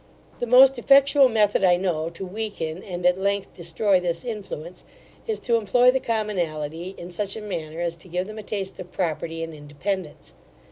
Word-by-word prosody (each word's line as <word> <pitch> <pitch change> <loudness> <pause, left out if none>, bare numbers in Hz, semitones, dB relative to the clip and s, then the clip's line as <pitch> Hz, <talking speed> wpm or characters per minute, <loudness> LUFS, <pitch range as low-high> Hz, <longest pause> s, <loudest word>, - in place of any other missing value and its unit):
The 245 - -2
most 260 +2 +7
effectual 275 +1 +6
method 210 -3 +2
I 180 -2 +6
know 170 -3 -1
to 170 +3 -7
weaken, 185 -4 -4
and 180 -2 -6
at 180 +1 +4
length 200 0 -1
destroy 180 +3 +1
this 175 +3 -3
influence, 195 -7 -6 0.4
is 440 -2 -2
to 235 -2 +2
employ 245 +4 +4
the 265 - 0
commonalty 175 - -3
in 175 +1 -8
such 195 +3 -3
a - - -5
manner 165 -5 -5
as 170 -1 -2
to 170 - -13
give 180 +1 -2
them 215 +2 -8
a - - -5
taste 195 -2 -5
of 180 - -8
property 165 -2 -2
and 165 0 -6
independence. 150 - -5
190 Hz, 185 wpm, -24 LUFS, 170-215 Hz, 0.4 s, most